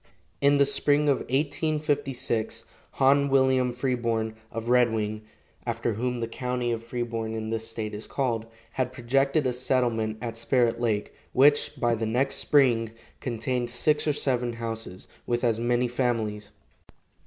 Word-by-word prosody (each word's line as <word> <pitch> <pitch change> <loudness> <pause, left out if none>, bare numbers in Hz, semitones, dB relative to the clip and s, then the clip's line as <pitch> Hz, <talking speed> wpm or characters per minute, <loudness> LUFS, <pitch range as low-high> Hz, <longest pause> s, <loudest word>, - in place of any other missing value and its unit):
In 140 0 +5
the 140 - +5
spring 145 +1 +2
of 140 - +4
1856 140 -4 -1 0.3
Hon. 140 +1 +4
William 130 -2 +3
Freeborn 115 -3 -1 0.2
of 115 0 -5
Red 125 -1 +4
Wing 110 -1 -2 0.4
(after 115 -1 -1
whom 125 +3 -2
the 115 - -1
county 125 0 -2
of 115 -1 -3
Freeborn 115 -2 -3
in 110 0 -4
this 115 0 -2
state 110 -1 -5
is 105 +1 -5
called) 115 -5 -1 0.2
had 130 -1 -1
projected 135 +4 +1
a 125 - +1
settlement 120 -4 0
at 115 -1 -5
Spirit 115 0 +1
lake, 110 -3 -1 0.2
which, 145 +3 +4
by 120 -1 +2
the 115 -1 -1
next 135 +5 +1
spring, 120 -6 +3 0.3
contained 120 0 -2
six 150 +6 +1
or 150 - +3
seven 125 -4 0
houses, 115 -5 -6 0.2
with 120 0 0
as 115 -2 +2
many 120 +1 +1
families. 115 -4 -1
120 Hz, 150 wpm, -27 LUFS, 115-130 Hz, 0.4 s, In